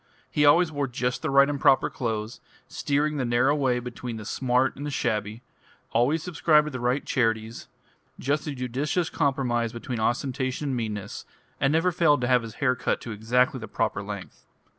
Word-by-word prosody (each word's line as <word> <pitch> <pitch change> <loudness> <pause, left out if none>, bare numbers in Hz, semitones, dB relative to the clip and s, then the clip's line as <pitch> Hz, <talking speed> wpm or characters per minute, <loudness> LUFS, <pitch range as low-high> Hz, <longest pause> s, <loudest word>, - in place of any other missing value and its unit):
He 150 - +2
always 165 +3 +5
wore 145 -2 -1
just 125 0 -2
the - - -2
right 140 0 +6
and 145 -2 -3
proper 135 - +5
clothes, 110 -2 -4 0.3
steering 150 +1 -1
the 135 - 0
narrow 125 +4 +2
way 130 -4 +1
between 120 -1 -6
the 110 - -8
smart 125 +3 +1
and 140 - -7
the 145 - -3
shabby, 110 -3 -2 0.5
always 140 +7 +2
subscribed 160 -3 +3
to 150 - -4
the 130 - -5
right 125 +4 0
charities, 115 -2 -1 0.5
just 140 +2 -1
the 150 -2 -4
judicious 135 +7 -2
compromise 125 -6 0
between 120 0 -5
ostentation 130 +4 -1
and 130 - -1
meanness, 105 -4 -4 0.4
and 135 - +2
never 165 +4 +2
failed 165 -5 +3
to 120 - 0
have 125 -1 +4
his 115 -2 -9
hair 130 -3 +1
cut 125 - -1
to 115 - -7
exactly 125 +5 +1
the 115 - -7
proper 105 - -1
length. 100 -1 -8
125 Hz, 185 wpm, -26 LUFS, 115-145 Hz, 0.5 s, right